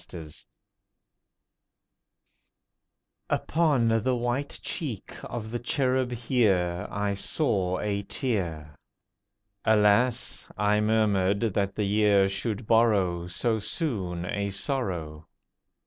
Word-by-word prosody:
GUERDON 80 Hz, -3 st, -8 dB, 3.0 s
Upon 150 Hz, -7 st, +2 dB
the 130 Hz, +3 st, +1 dB
white 120 Hz, +4 st, -2 dB
cheek 140 Hz, -, -4 dB
of 110 Hz, -2 st, -6 dB
the 120 Hz, -, -2 dB
Cherub 130 Hz, 0 st, 0 dB, 0.2 s
Year 90 Hz, -8 st, +2 dB
I 105 Hz, 0 st, -1 dB
saw 95 Hz, -, 0 dB
a 100 Hz, -1 st, -1 dB
tear. 90 Hz, -, -3 dB, 0.9 s
Alas! 110 Hz, +3 st, +2 dB
I 105 Hz, +1 st, +2 dB
murmured, 105 Hz, -3 st, +2 dB
that 100 Hz, 0 st, -1 dB
the 105 Hz, -, -1 dB
Year 100 Hz, -1 st, +4 dB
should 105 Hz, +3 st, -2 dB
borrow 100 Hz, -7 st, +2 dB
So 110 Hz, +5 st, 0 dB
soon 100 Hz, -, -2 dB
a 100 Hz, +2 st, -2 dB
sorrow. 90 Hz, -, -3 dB
105 Hz, 95 wpm, -27 LUFS, 95-120 Hz, 3.0 s, Year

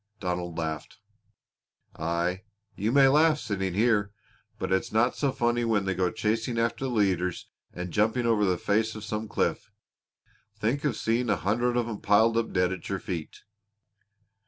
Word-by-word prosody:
Donald 90 Hz, -2 st, -3 dB
laughed. 80 Hz, -2 st, -4 dB, 1.0 s
"Aye! 85 Hz, +3 st, -1 dB, 0.3 s
You 105 Hz, +4 st, -1 dB
may 140 Hz, +1 st, +6 dB
well 135 Hz, -, +6 dB
laugh, 160 Hz, -1 st, +4 dB
sitting 95 Hz, -6 st, -3 dB
here, 105 Hz, -2 st, +2 dB, 0.5 s
but 95 Hz, -, -4 dB
it's 95 Hz, -, 0 dB
no 115 Hz, +3 st, +3 dB
so 140 Hz, -2 st, -1 dB
funny 120 Hz, -2 st, 0 dB
when 110 Hz, -4 st, +1 dB
they 95 Hz, -, 0 dB
go 90 Hz, 0 st, +1 dB
chasing 115 Hz, +3 st, -1 dB
after 115 Hz, +3 st, 0 dB
the -, -, -1 dB
leaders 95 Hz, -6 st, 0 dB, 0.2 s
and 90 Hz, -1 st, -6 dB
jumping 110 Hz, +3 st, +2 dB
over 115 Hz, -3 st, +3 dB
the 90 Hz, -3 st, +2 dB
face 110 Hz, +4 st, 0 dB
of 110 Hz, -, -7 dB
some 110 Hz, +1 st, -4 dB
cliff. -, -, -1 dB, 0.9 s
Think 120 Hz, +7 st, -1 dB
of 135 Hz, -7 st, 0 dB
seeing 115 Hz, +1 st, 0 dB
a 105 Hz, -, +3 dB
hundred 120 Hz, +6 st, 0 dB
of 120 Hz, -1 st, 0 dB
'em 110 Hz, -3 st, -5 dB
piled 110 Hz, +3 st, +4 dB
up 115 Hz, 0 st, 0 dB
dead 90 Hz, 0 st, +1 dB
at 95 Hz, -, -8 dB
your 100 Hz, -, -1 dB
feet!" 85 Hz, -5 st, -6 dB
105 Hz, 175 wpm, -27 LUFS, 95-115 Hz, 1.0 s, may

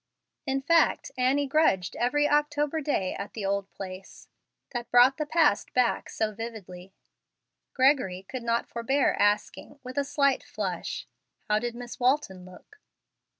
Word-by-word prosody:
In 270 Hz, 0 st, -1 dB
fact, 330 Hz, +2 st, +2 dB
Annie 265 Hz, +3 st, +2 dB
grudged 270 Hz, -, +1 dB
every 295 Hz, +5 st, +1 dB
October 295 Hz, +1 st, +1 dB
day 205 Hz, -11 st, -1 dB
at 200 Hz, -, -7 dB
the 210 Hz, -3 st, -5 dB
old 200 Hz, 0 st, -1 dB
place, 190 Hz, 0 st, -10 dB, 0.4 s
that 240 Hz, -2 st, -5 dB
brought 245 Hz, +2 st, +6 dB
back -, -, -41 dB
the 320 Hz, -11 st, +2 dB
past 250 Hz, -1 st, +1 dB
so 215 Hz, -1 st, -2 dB
vividly. 195 Hz, -5 st, -9 dB, 0.8 s
Gregory 255 Hz, -9 st, +2 dB
could 255 Hz, -2 st, -5 dB
not 235 Hz, 0 st, 0 dB
forbear 265 Hz, +4 st, +1 dB
asking, 205 Hz, +7 st, 0 dB
with 255 Hz, +2 st, -4 dB
a -, -, +1 dB
slight 280 Hz, -1 st, +1 dB
flush, -, -, -4 dB, 0.4 s
"How 210 Hz, 0 st, +2 dB
did 240 Hz, +1 st, -4 dB
Miss 240 Hz, 0 st, -8 dB
Walton 250 Hz, -8 st, 0 dB
look?" 185 Hz, -, -16 dB
245 Hz, 145 wpm, -27 LUFS, 205-280 Hz, 0.8 s, brought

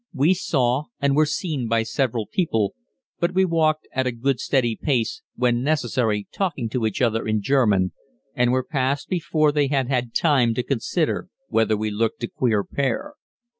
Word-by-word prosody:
We 150 Hz, +7 st, +4 dB
saw 135 Hz, -6 st, 0 dB
and 140 Hz, -1 st, +2 dB
were 155 Hz, 0 st, +4 dB
seen 150 Hz, -, -2 dB
by 115 Hz, 0 st, +2 dB
several 115 Hz, 0 st, -1 dB
people, 110 Hz, -, 0 dB, 0.5 s
but 175 Hz, +1 st, 0 dB
we 190 Hz, 0 st, +4 dB
walked 155 Hz, -3 st, +1 dB
at 130 Hz, 0 st, 0 dB
a -, -, +1 dB
good 125 Hz, +2 st, -1 dB
steady 120 Hz, -5 st, +1 dB
pace, 130 Hz, -, -1 dB
when 120 Hz, -1 st, +1 dB
necessary 120 Hz, -7 st, 0 dB
talking 150 Hz, -, -2 dB
to 115 Hz, -1 st, 0 dB
each 110 Hz, +4 st, -2 dB
other 115 Hz, -2 st, +1 dB
in 110 Hz, -1 st, 0 dB
German, 105 Hz, -8 st, +2 dB, 0.4 s
and 125 Hz, 0 st, +2 dB
were 130 Hz, 0 st, +1 dB
past 135 Hz, 0 st, -1 dB
before 155 Hz, -4 st, +1 dB
they 145 Hz, -1 st, +2 dB
had 135 Hz, -2 st, 0 dB
had 125 Hz, -3 st, -1 dB
time 130 Hz, -8 st, +3 dB
to 125 Hz, -, -1 dB
consider 150 Hz, +8 st, -1 dB, 0.2 s
whether 110 Hz, -1 st, +2 dB
we 110 Hz, 0 st, -2 dB
looked 110 Hz, +3 st, -1 dB
a -, -, 0 dB
queer 110 Hz, -6 st, 0 dB
pair. 140 Hz, -, -2 dB
130 Hz, 175 wpm, -23 LUFS, 115-150 Hz, 0.5 s, We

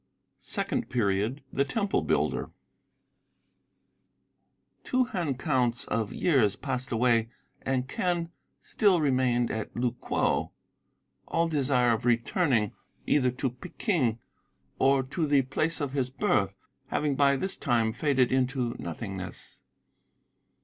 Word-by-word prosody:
SECOND -, -, -2 dB
PERIOD 110 Hz, +3 st, 0 dB
THE 140 Hz, -, +2 dB
TEMPLE 200 Hz, +8 st, 0 dB
BUILDER -, -, 0 dB, 2.3 s
Two 255 Hz, 0 st, +2 dB
hand 175 Hz, -, -2 dB
counts 125 Hz, -4 st, 0 dB
of 110 Hz, -3 st, -1 dB
years 120 Hz, -, +2 dB
passed 130 Hz, -1 st, -4 dB
away 115 Hz, -1 st, +2 dB, 0.3 s
and 130 Hz, -1 st, -1 dB
Quen 170 Hz, +3 st, -1 dB, 0.3 s
still 200 Hz, -5 st, +2 dB
remained 130 Hz, -4 st, +2 dB
at 110 Hz, -1 st, -4 dB
Lu 120 Hz, 0 st, +1 dB
kwo, 120 Hz, -, -1 dB, 0.7 s
all 165 Hz, 0 st, +1 dB
desire 135 Hz, -6 st, +2 dB
of 110 Hz, -, -2 dB
returning 120 Hz, -, +2 dB, 0.3 s
either 130 Hz, -4 st, +3 dB
to 125 Hz, +1 st, -2 dB
Peking 130 Hz, -, -1 dB, 0.6 s
or 135 Hz, 0 st, +4 dB
to 150 Hz, +5 st, -2 dB
the 140 Hz, -2 st, +4 dB
place 155 Hz, +6 st, -1 dB
of 145 Hz, -3 st, -2 dB
his 130 Hz, -3 st, 0 dB
birth 130 Hz, -, +1 dB, 0.3 s
having 145 Hz, -2 st, 0 dB
by 140 Hz, 0 st, +4 dB
this 190 Hz, +8 st, -1 dB
time 115 Hz, -2 st, +1 dB
faded 130 Hz, -1 st, +1 dB
into 130 Hz, -2 st, 0 dB
nothingness. 95 Hz, +1 st, -6 dB
130 Hz, 115 wpm, -28 LUFS, 120-145 Hz, 2.3 s, or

